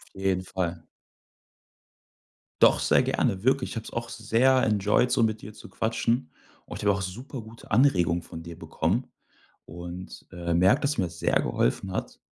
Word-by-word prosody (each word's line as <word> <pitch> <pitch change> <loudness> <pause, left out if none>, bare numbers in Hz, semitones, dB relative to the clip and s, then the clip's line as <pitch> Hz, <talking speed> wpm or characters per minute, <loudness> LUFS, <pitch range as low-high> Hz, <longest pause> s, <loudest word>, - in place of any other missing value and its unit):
Auf 95 - -9
jeden 95 -1 +1
Fall. 90 -3 -3 1.8
Doch, - - +6
sehr - - +4
gerne. 95 -1 0
Wirklich. 130 0 +2
Ich - - -7
hab's 115 - -6
auch 115 0 -4
sehr 125 +4 +2
enjoyed, 105 +3 +2
so 125 -2 +2
mit 110 -1 0
dir 105 - -9
zu 105 - -13
quatschen. 115 -2 -1 0.4
Und - - -7
ich - - -6
habe 100 - +5
auch 95 - -3
super 120 +8 -6
gute 110 +1 -14
Anregungen 90 -8 +3
von 80 - -9
dir 85 0 -10
bekommen. 85 +8 -1 0.6
Und, 85 +2 -9
äh, 85 -1 -2
merke, 90 +3 +4
dass 140 -3 0
mir 95 - +2
das 85 0 -10
sehr - - +2
geholfen 95 - -1
hat. - - -5
100 Hz, 175 wpm, -27 LUFS, 90-115 Hz, 1.8 s, Doch